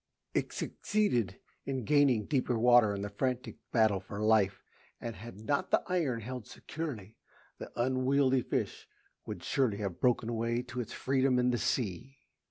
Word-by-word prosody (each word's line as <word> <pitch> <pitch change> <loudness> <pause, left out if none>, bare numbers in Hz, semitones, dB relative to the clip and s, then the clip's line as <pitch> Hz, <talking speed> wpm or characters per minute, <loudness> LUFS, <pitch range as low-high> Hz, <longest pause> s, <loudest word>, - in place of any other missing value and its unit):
It - - 0
succeeded 120 - 0 0.2
in 135 -2 -3
gaining 140 -7 +4
deeper 130 -4 0
water 120 -3 +5
in 100 - -4
the 105 - -3
frantic 125 +4 -2
battle 110 -4 +3
for 100 +2 -8
life, 105 -3 +3 0.4
and 115 -1 -5
had 105 +1 -10
not 145 +10 0
the - - +3
iron 155 -10 0
held 125 0 -6
securely, 120 - -6 0.4
the - - -8
unwieldy 130 +1 +3
fish - - -3 0.4
would - - -6
surely 125 -7 +1
have 100 -4 -4
broken 125 -2 +2
away 115 +1 -1
to 125 0 -4
its 115 - -7
freedom 130 -1 +1
in 125 0 +3
the 120 - 0
sea. 120 +4 -2
120 Hz, 160 wpm, -31 LUFS, 110-130 Hz, 0.4 s, water